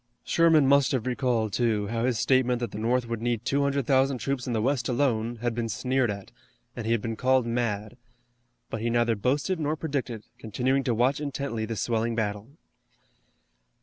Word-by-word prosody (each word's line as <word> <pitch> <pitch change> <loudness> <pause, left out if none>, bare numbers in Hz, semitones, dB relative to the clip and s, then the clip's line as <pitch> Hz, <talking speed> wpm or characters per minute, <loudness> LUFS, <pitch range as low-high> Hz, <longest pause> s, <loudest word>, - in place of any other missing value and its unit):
Sherman 165 -3 +4
must 140 +1 +4
have 130 -3 -1
recalled, 120 -4 0
too, 110 -4 +1
how 115 0 -1
his 125 -3 +1
statement 125 0 +2
that 120 -4 -3
the - - -6
North 120 +2 +1
would 115 -1 -4
need 120 -1 -1
200,000 140 -1 +2
troops 135 0 -3
in 125 - -1
the 110 - +1
west 135 0 0
alone 120 -3 0
had 120 -1 0
been 115 0 -2
sneered 130 +3 0
at, 100 -1 -6 0.4
and 115 -2 -5
he - - +1
had 115 -3 +1
been 115 -1 -2
called 130 +1 +2
mad. 115 -3 -2 0.7
But 110 - -3
he 120 - 0
neither 120 -1 +2
boasted 145 - 0
nor 155 0 0
predicted, 140 -8 -3 0.2
continuing 130 +5 0
to 120 - +1
watch 130 +5 +2
intently 140 -6 -3
the 115 +1 -4
swelling 115 +1 -1
battle. 105 -1 -2
120 Hz, 180 wpm, -27 LUFS, 115-135 Hz, 0.7 s, Sherman